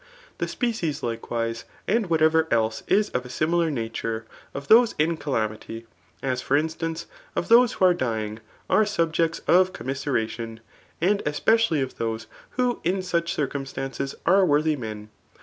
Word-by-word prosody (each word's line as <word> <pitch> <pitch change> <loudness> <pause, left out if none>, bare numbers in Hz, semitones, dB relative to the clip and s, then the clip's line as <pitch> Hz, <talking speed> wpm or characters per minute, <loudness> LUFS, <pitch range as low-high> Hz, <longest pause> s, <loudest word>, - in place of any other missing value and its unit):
The - - -1
species^ 225 - -2
likewise, 115 0 -3 0.2
and 220 -3 +1
wbatevar 160 0 +3
else 110 -1 +1
is 210 +1 +2
of 125 - -1
a - - -10
^milar 165 +4 +1
nature, 115 -2 -3 0.3
of 140 0 -7
those 235 +1 +6
in 160 +2 +2
calamity^ 115 -5 -3 0.4
as 130 -1 -1
for 140 +3 +2
instahcf^ 160 +1 -3 0.3
of - - +1
f - - -14
hoae 240 0 +7
wbo - - -20
are 180 - +5
dyixigi 110 -7 -2 0.3
are 215 - +4
subjects 165 -3 0
of 185 +1 +5
cotnmi^e^tion; 120 -4 -3 0.4
and 200 +5 +2
especi^Uyof 150 - +1
chose 115 -1 -2 0.3
yfho 250 -1 +1
in 185 +2 0
such 170 -2 -1
eirciLin3taoi::es 135 -1 -3
tfd 190 +2 +5
wottby 155 +1 +3
mea. 110 -5 -6
150 Hz, 150 wpm, -25 LUFS, 115-175 Hz, 0.4 s, hoae